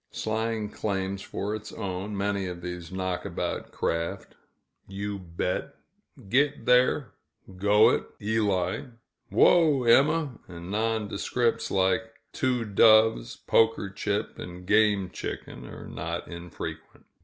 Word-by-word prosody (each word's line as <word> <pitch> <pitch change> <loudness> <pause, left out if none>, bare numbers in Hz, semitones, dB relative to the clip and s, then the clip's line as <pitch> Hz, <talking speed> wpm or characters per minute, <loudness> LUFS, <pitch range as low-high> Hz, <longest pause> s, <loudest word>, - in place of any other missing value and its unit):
Slang 110 -1 -2
claims 95 -2 -2
for 100 +2 -4
its 110 0 -6
own, 100 0 -4
many 100 -1 -1
of 90 -1 -6
these 90 -1 -6
knockabout 95 -1 -3
craft 85 0 -3 0.5
"U. 100 +1 -4
Bet," 90 0 -3 0.5
"Git 140 +2 +1
Thair," 125 +2 +3 0.5
"Go 105 +4 +5
it, - - 0
Eli," 100 -3 0 0.4
"Whoa, 155 -7 +5
Emma!" 140 +3 +3
and 85 +1 -9
nondescripts, 110 +2 0
like 95 +4 +2 0.3
"Two 125 -3 0
Doves," 110 - +4
"Poker 110 -3 +3
Chip," 100 +1 -3
and 90 0 -8
"Game 105 -2 +3
Chicken," - - -7
are - - -9
not 85 +2 -5
infrequent. 85 0 -8
105 Hz, 110 wpm, -27 LUFS, 95-115 Hz, 0.5 s, Go